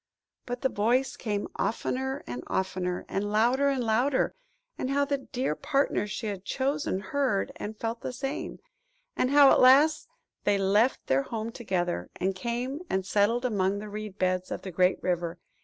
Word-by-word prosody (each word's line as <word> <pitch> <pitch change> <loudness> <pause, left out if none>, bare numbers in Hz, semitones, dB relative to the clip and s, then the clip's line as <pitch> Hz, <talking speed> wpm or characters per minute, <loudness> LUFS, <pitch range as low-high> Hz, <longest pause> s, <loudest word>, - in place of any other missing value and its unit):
But 245 0 -4
the 265 - +2
voice 245 +5 +1
came 205 -3 -2
oftener 265 +4 -2
and 120 0 -6
oftener, 185 -1 -2
and 205 +1 -2
louder 245 +6 +3
and 265 -3 0
louder; 245 +5 +2 0.4
and 260 - -3
how 280 +1 +2
the 280 0 -1
dear 255 - -2
partner 275 - 0
she 215 +2 -5
had 200 -3 -4
chosen 275 0 -1
heard 235 -1 0
and 215 +1 -6
felt 230 +1 -3
the - - -4
same; 270 +4 -4 0.6
and 255 - +1
how 285 -1 +7
at - - +5
last 280 +5 +6 0.4
they 205 -1 +3
left 205 +6 +2
their 130 +1 +2
home 225 +8 -4
together, 175 - -2
and 190 +1 -1
came 240 +8 -3
and 190 -1 0
settled 210 +5 +2
down 250 -3 0
among 195 0 +1
the 210 +1 -6
reed 210 -1 -6
beds 185 -1 0
of - - -5
the 190 - -6
great 180 +2 +3
river. 175 -1 -1
220 Hz, 175 wpm, -28 LUFS, 190-260 Hz, 0.6 s, how